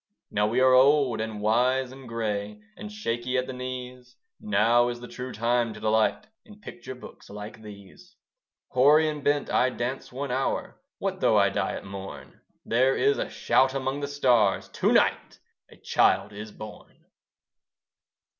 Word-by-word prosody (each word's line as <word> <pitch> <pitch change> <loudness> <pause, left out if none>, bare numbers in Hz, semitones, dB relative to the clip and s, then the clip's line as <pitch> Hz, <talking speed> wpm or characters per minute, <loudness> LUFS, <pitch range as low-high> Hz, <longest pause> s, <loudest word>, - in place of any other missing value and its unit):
Now 105 0 +1
we 115 +4 0
are 130 0 +5
old 130 -3 +4
and 110 -1 -5
wise 125 +4 +1
and 130 -2 -12
grey, 105 -2 -3 0.2
And 210 - -9
shaky 125 - -2
at 125 - 0
the 130 - -6
knees; 125 -1 -7 0.2
Now 115 +4 +3
is 120 0 -4
the 120 - -9
true 125 +1 -7
time 115 0 0
to - - -10
delight 110 - +1 0.2
In 210 -3 -16
picture 130 - -9
books 125 - -13
like 105 +2 -9
these. 100 -3 -14 0.5
Hoary 150 +5 +5
and 150 -2 -4
bent 145 0 0
I 130 - +3
dance 125 +1 -4
one 135 +1 -4
hour: 130 +2 -2 0.2
What - - -3
though - - +4
I - - +4
die - - -2
at - - -7
morn? 95 0 -9 0.2
There 130 +3 +2
is 140 +2 +2
a - - -2
shout 130 +1 +2
among 135 +1 -2
the 140 - -3
stars, 125 -8 +2
"To - - 0
night - - +1 0.3
a - - -17
child 100 +2 +1
is 105 +1 -8
born." 105 0 -12
125 Hz, 165 wpm, -26 LUFS, 110-130 Hz, 0.5 s, are